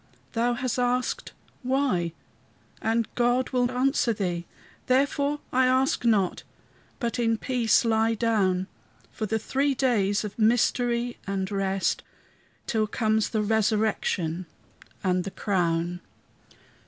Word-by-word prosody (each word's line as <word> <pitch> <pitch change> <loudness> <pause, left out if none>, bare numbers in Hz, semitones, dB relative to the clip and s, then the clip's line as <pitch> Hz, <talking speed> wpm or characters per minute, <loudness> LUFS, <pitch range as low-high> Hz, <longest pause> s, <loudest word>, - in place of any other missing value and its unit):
Thou 240 +1 +1
hast 250 0 -2
asked, 250 +1 0 0.3
"Why?" 255 -10 0 0.7
and 225 0 +1
God 245 +1 +1
will 250 -1 +2
answer 255 -1 +1
thee, 175 -4 -3 0.4
Therefore 280 +2 +1
I 255 0 +4
ask 260 +2 +2
not, 210 -6 +2 0.6
but 235 0 -2
in 230 -1 +2
peace 240 -2 +2
lie 225 0 +2
down, 200 -5 +1 0.5
For 215 - -4
the 220 - 0
three 275 +5 0
days 210 -7 +1
of 210 +1 -7
mystery 240 +1 +2
and 195 0 -2
rest, 195 -1 0 0.6
Till 220 -2 0
comes 220 0 +1
the 215 -2 0
resurrection 210 -5 0 0.6
and 180 -1 +1
the 195 - -4
crown. 175 -3 -1
225 Hz, 115 wpm, -26 LUFS, 195-245 Hz, 0.7 s, I